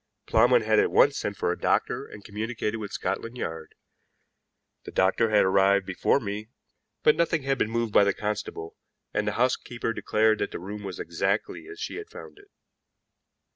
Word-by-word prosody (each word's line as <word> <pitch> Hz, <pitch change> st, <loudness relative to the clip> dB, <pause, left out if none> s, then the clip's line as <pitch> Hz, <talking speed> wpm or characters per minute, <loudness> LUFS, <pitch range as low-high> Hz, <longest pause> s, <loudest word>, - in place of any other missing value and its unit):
Plowman 120 Hz, +1 st, +4 dB
had 110 Hz, 0 st, +3 dB
at -, -, +3 dB
once -, -, +4 dB
sent -, -, -3 dB
for -, -, 0 dB
a -, -, -4 dB
doctor -, -, 0 dB
and 105 Hz, -, -12 dB
communicated 110 Hz, +1 st, -3 dB
with 105 Hz, -2 st, -6 dB
Scotland 115 Hz, +6 st, -3 dB
Yard. 80 Hz, -8 st, -6 dB, 1.1 s
The -, -, -8 dB
doctor 95 Hz, +4 st, +2 dB
had 105 Hz, -1 st, +4 dB
arrived 95 Hz, +1 st, +3 dB
before 95 Hz, +8 st, +1 dB
me, 105 Hz, -1 st, -5 dB, 0.5 s
but 150 Hz, -, +6 dB
nothing 165 Hz, -3 st, +1 dB
had 135 Hz, 0 st, 0 dB
been 110 Hz, -, +1 dB
moved 115 Hz, -2 st, -1 dB
by -, -, +7 dB
the 100 Hz, -, +3 dB
constable, 105 Hz, -5 st, -4 dB, 0.4 s
and 105 Hz, 0 st, -1 dB
the 105 Hz, -, 0 dB
housekeeper 120 Hz, -1 st, -1 dB
declared 110 Hz, 0 st, +2 dB
that -, -, -1 dB
the -, -, -6 dB
room 100 Hz, +4 st, -7 dB
was 95 Hz, -3 st, -7 dB
exactly 95 Hz, -, -2 dB
as 415 Hz, 0 st, -10 dB
she 450 Hz, -, -5 dB
had 420 Hz, 0 st, -8 dB
found 410 Hz, -, -11 dB
it. 405 Hz, 0 st, -20 dB
105 Hz, 180 wpm, -26 LUFS, 100-120 Hz, 1.1 s, by